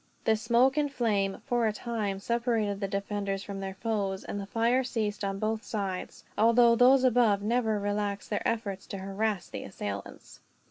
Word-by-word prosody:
The 220 - +3
smoke 245 +5 +3
and 290 -1 +1
flame, 210 -6 0
for 240 -2 +1
a - - +2
time, 215 -3 -3
separated 225 -2 0
the 200 - -1
defenders 200 0 -3
from 200 -1 -6
their 195 -1 -5
foes; 195 -2 -2
and 205 - -5
the 200 - -6
fire 235 +5 +2
ceased 215 -4 -2
on 195 0 -1
both 215 +2 -1
sides, 195 -4 -4
although 235 +2 +5
those 255 +2 +6
above 230 -5 +3
never 225 -1 +1
relaxed 205 0 -2
their 210 - 0
efforts 205 -4 -3
to 195 - -5
harass 195 0 -2
the - - -6
assailants. 100 0 -7
210 Hz, 175 wpm, -29 LUFS, 195-235 Hz, -, those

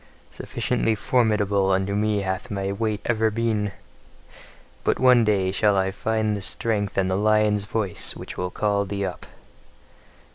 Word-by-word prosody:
Sufficiently 115 -1 -1
formidable 105 -5 +1
unto 95 +1 0
me 105 0 +1
hath 95 +4 -3
thy 100 -2 -2
weight 105 0 -2
ever 110 -1 +2
been: 110 -2 -1 1.1
but - - +1
one 125 -2 +5
day 100 -3 +1
shall 100 +1 +2
I 95 - +2
yet 95 - -3
find 110 0 0
the 100 - -5
strength 100 0 -2
and 95 -1 +2
the 95 - 0
lion's 105 0 +2
voice 105 -4 -3
which - - -8
will 90 - -3
call 100 +1 0
thee 100 0 -3
up! 90 - -6
105 Hz, 155 wpm, -24 LUFS, 100-110 Hz, 1.1 s, one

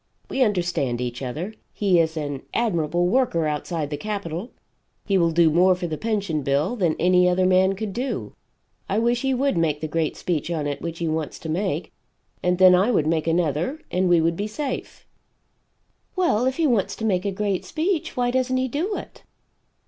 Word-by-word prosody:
We 270 - -1
understand 175 - +1
each 125 0 -4
other. 155 - -4 0.2
He 190 -4 +2
is 160 0 +1
an 145 -3 -3
admirable 175 -7 +1
worker 180 -5 +2
outside 150 0 -2
the 145 - -2
capitol; 200 - -4 0.6
he 200 - +1
will 170 -3 +4
do 165 -1 +4
more 180 +3 +4
for 180 - -5
the 160 -2 -2
Pension 200 -5 -1
bill 140 - 0
than 175 -8 +1
any 180 0 +4
other 185 +1 +2
man 185 +1 +4
could 200 0 -5
do; 255 +5 -3 0.6
I 195 - 0
wish 235 +2 +1
he 270 -1 +1
would 270 -6 +1
make 155 -3 +1
the 155 - -3
great 160 0 -1
speech 170 -2 -2
on 160 -4 -2
it 145 -1 -3
which 170 0 -5
he 170 - -2
wants 155 -2 -2
to 160 - -7
make 175 -1 -2 0.5
and 180 0 +1
then 185 0 +7
I 190 +5 +4
would 195 -11 +2
make 160 0 0
another 165 - 0
and 180 0 +1
we 175 -2 +5
would 165 +1 +1
be 205 +4 -3
safe." 265 +4 -5 1.1
"Well 340 - +2
if 260 - -1
he 330 - +2
wants 235 -9 +1
to 220 - -4
make 185 -4 +1
a - - 0
great 195 -1 -1
speech 330 -1 -2
why 245 0 +1
doesn't 255 0 +1
he 260 0 0
do 330 - -2
it?" - - -10
180 Hz, 200 wpm, -23 LUFS, 160-220 Hz, 1.1 s, then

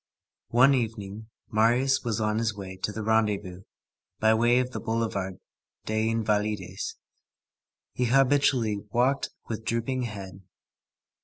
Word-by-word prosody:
One 125 +4 +6
evening, 110 -3 -3 0.2
Marius 120 +5 +3
was 115 -2 -1
on 105 0 +1
his 110 -1 0
way 95 -2 -7
to 95 +3 -3
the 110 +1 -5
rendezvous, 105 -4 0 0.6
by 110 0 +4
way 120 +2 +4
of 125 0 0
the - - -4
Boulevard 105 -5 -2 0.5
des 110 +1 0
Invalides. 105 -4 -1 1.0
He 125 - 0
habitually 130 -3 +3
walked 125 +6 +1 0.2
with 110 -1 -4
drooping 115 +3 -1
head. 95 -4 -8
110 Hz, 125 wpm, -27 LUFS, 105-120 Hz, 1.0 s, One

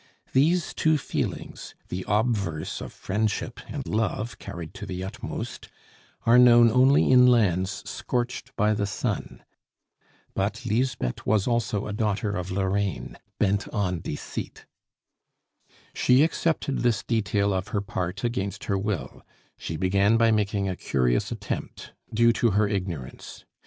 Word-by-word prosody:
These 160 +6 +3
two 155 0 +2
feelings, 140 - -4
the 90 +1 -3
obverse 105 -7 0
of - - -7
friendship 110 +3 -2
and 140 -2 -5
love 110 +2 -2
carried 85 -4 -7
to - - -8
the 90 0 -4
utmost, 95 - -6 0.6
are 120 +2 +6
known 120 -2 +7
only 130 +4 +5
in 125 -1 +7
lands 95 -5 +2
scorched 125 0 -3
by 105 -1 +2
the 105 -1 -1
sun. 105 - -3 0.9
But 110 +6 -2
Lisbeth 120 - -1
was 105 -2 +3
also 115 -4 0
a 105 - -4
daughter 105 0 0
of 90 -2 -3
Lorraine, 95 +1 -1 0.2
bent 100 0 +1
on 90 -4 -1
deceit. 75 - -6 1.3
She 130 +3 +4
accepted 160 -3 0
this 120 -4 +1
detail 100 -3 +1
of 95 -1 -2
her 105 - -1
part 95 0 -4
against 100 -5 -2
her 100 -2 0
will; 100 -2 -3 0.3
she 80 - -5
began 100 +5 +3
by 115 0 +4
making 105 -2 +1
a 95 - -2
curious 65 -7 0
attempt, - - -5 0.2
due 115 +1 +4
to 115 0 +2
her 105 0 +4
ignorance. 90 - -5
105 Hz, 135 wpm, -26 LUFS, 95-120 Hz, 1.3 s, known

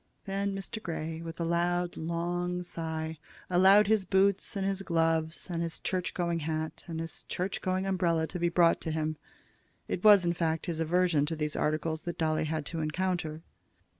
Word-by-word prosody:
Then 200 0 -1
Mr. 195 +3 -5
Grey, 160 -3 -4
with 165 0 -7
a - - 0
loud, 175 +1 0
long 175 +2 -2
sigh, 160 -2 -4 0.3
allowed 190 +4 +7
his 215 -1 +3
boots, 195 +1 +2
and 195 -1 -1
his 195 0 -1
gloves, 165 -2 0
and 170 -2 -2
his 165 -1 -3
church 185 -2 -2
going 170 -2 0
hat, 155 0 -3
and 165 -2 -4
his 165 0 -5
church 185 +2 -3
going 185 +1 0
umbrella 175 -4 +1
to 180 +2 -5
be 175 0 +2
brought 170 -1 +4
to 160 - -3
him. 155 0 -1 0.7
It 180 - -3
was, 205 -4 +8
in 170 - +2
fact, 165 -2 -1
his 165 -3 -3
aversion 165 -2 +2
to 165 - -2
these 150 -1 -2
articles 155 +1 0
that 170 +1 -5
Dolly 155 -1 +1
had 155 -1 -2
to 165 - -4
encounter. 160 0 -2
170 Hz, 185 wpm, -30 LUFS, 160-185 Hz, 0.7 s, was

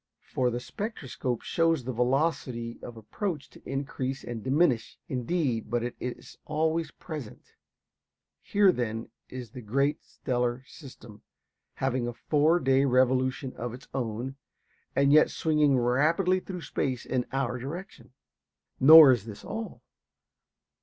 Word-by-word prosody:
For 125 -1 +2
the 120 0 -3
spectroscope 130 - -4
shows 165 -4 +1
the 130 +2 -4
velocity 125 -2 -1
of 120 -1 -9
approach 150 - -4
to - - -16
increase 135 -1 -3
and 120 -2 -6
diminish, 135 -3 +1
indeed, 130 -2 -1
but 120 -1 0
it 120 - -4
is 125 -1 -7
always 160 +2 0
present. 150 -10 -9 0.9
Here, 200 -2 +4
then, 115 -6 -4 0.2
is 125 -4 -8
this 125 - -9
great 140 +7 0
stellar 125 0 -2
system, 125 -9 -13 0.5
having 130 -2 -1
a 120 - -4
four 155 +7 +2
day 135 -1 +3
revolution 130 0 +1
of 120 0 -5
its 130 - -15
own, 125 +2 -3 0.6
and 140 +1 +4
yet 155 - +6
swinging 150 -4 +2
rapidly 155 +10 +2
through 185 -1 -7
space 130 -3 -2
in 125 -1 -1
our 130 -2 -1
direction. 140 -2 -8 0.7
Nor 155 0 +10
is 120 -5 0
this 105 -3 -10
all. 225 +1 -6
130 Hz, 135 wpm, -28 LUFS, 120-155 Hz, 0.9 s, Nor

